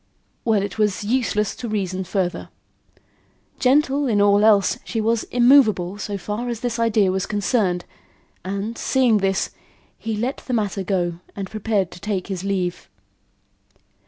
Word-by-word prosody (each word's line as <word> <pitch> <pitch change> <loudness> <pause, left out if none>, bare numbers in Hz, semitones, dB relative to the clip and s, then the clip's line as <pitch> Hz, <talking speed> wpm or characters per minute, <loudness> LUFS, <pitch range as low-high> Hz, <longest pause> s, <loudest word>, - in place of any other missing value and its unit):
Well, 215 -4 +2
it 200 +1 -5
was 210 -2 +1
useless 215 -2 0
to 240 - -5
reason 190 -3 -2
further. 185 -1 -2 1.1
Gentle 280 +1 +3
in 215 -4 +2
all 205 0 +4
else, 205 -3 +4
she 225 - -3
was 225 +1 +1
immovable 235 -7 +4
so 205 -1 -3
far 210 +6 -4
as 235 -2 -4
this 240 -1 -2
idea 215 -4 +3
was 190 0 -1
concerned 200 -4 0 0.6
and, 200 +4 -4
seeing 250 -5 +3
this, 195 -1 0 0.5
he 225 -1 -3
let 245 +6 -2
the 255 - -6
matter 205 -4 0
go 175 -3 -1 0.2
and 195 -2 -6
prepared 210 -4 -1
to 175 - -11
take 195 -1 -3
his 190 -2 -4
leave. 185 -3 -2
210 Hz, 150 wpm, -22 LUFS, 190-230 Hz, 1.1 s, all